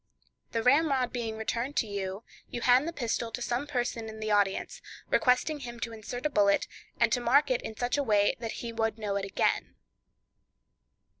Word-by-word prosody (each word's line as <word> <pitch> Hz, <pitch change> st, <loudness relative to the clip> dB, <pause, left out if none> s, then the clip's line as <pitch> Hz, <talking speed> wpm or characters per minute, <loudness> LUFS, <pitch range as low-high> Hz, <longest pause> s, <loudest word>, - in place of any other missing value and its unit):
The 230 Hz, -1 st, -1 dB
ramrod 270 Hz, -1 st, +3 dB
being 225 Hz, -3 st, -3 dB
returned 235 Hz, +5 st, -2 dB
to -, -, +2 dB
you, 200 Hz, 0 st, -4 dB, 0.3 s
you 240 Hz, -, -5 dB
hand 255 Hz, +5 st, +5 dB
the -, -, -1 dB
pistol 235 Hz, -6 st, -2 dB
to 235 Hz, -, -5 dB
some 245 Hz, +3 st, -2 dB
person 240 Hz, -4 st, -2 dB
in 220 Hz, 0 st, -9 dB
the 215 Hz, 0 st, -2 dB
audience, 200 Hz, -2 st, +1 dB, 0.3 s
requesting 265 Hz, +4 st, +3 dB
him 240 Hz, -3 st, -7 dB
to 230 Hz, -, -3 dB
insert 235 Hz, +4 st, -7 dB
a -, -, +3 dB
bullet, 200 Hz, -4 st, +3 dB, 0.3 s
and -, -, +4 dB
to 250 Hz, -, +2 dB
mark 270 Hz, +4 st, +4 dB
it 250 Hz, -, +1 dB
in 220 Hz, -, -7 dB
such 245 Hz, +3 st, 0 dB
a -, -, +2 dB
way 205 Hz, -4 st, +3 dB
that 230 Hz, -2 st, -4 dB
he 230 Hz, -, -4 dB
would 225 Hz, -1 st, -1 dB
know 210 Hz, -2 st, -2 dB
it 195 Hz, -, -2 dB
again. 195 Hz, -, 0 dB
235 Hz, 195 wpm, -29 LUFS, 220-250 Hz, 0.3 s, hand